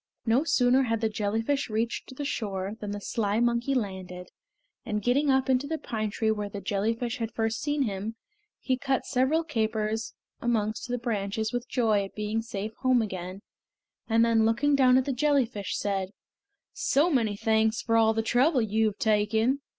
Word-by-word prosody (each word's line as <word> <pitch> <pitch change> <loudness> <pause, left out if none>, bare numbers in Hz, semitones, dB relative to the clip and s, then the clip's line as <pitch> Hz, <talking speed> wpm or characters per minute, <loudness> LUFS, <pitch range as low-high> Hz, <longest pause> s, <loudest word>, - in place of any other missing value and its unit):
No 240 +5 +3
sooner 255 -4 +3
had 230 -3 0
the 220 0 0
jellyfish 225 +6 -1
reached 230 +4 -3
the 285 - -4
shore 200 -6 -3
than 210 - -5
the 205 0 -4
sly 205 0 -1
monkey 240 +3 +1
landed, 185 -5 -4 0.5
and 210 -4 -2
getting 280 +4 +2
up 265 0 +3
into 260 +1 +1
the 320 +1 -2
pine 215 -7 -3
tree 220 +1 0
where 210 -1 -3
the 200 - -6
jellyfish 220 +5 -1
had 225 -1 -3
first 225 0 -1
seen 290 -1 0
him, 210 0 -3 0.4
he 260 -1 0
cut 265 0 -1
several 275 +5 +1
capers 220 -5 -2 0.3
amongst 220 -2 -1
the 245 0 -1
branches 220 -2 -2
with 245 0 -3
joy 220 -5 +2
at 195 - -9
being 210 +1 -1
safe 220 -1 -5
home 255 -3 +3
again, 185 -1 -6 0.7
and 225 +1 +4
then 225 -1 +3
looking 235 +6 +2
down 255 -2 +5
at 260 - +2
the 275 - -1
jellyfish 255 -6 0
said: 195 -2 -1 0.6
"So 310 +6 +2
many 225 -7 +1
thanks 220 +1 +1
for 230 - +1
all 225 -1 +4
the 225 - 0
trouble 255 +6 +3
you 220 +1 +1
have 210 -1 -3
taken! 220 +5 +1
225 Hz, 180 wpm, -27 LUFS, 210-255 Hz, 0.7 s, down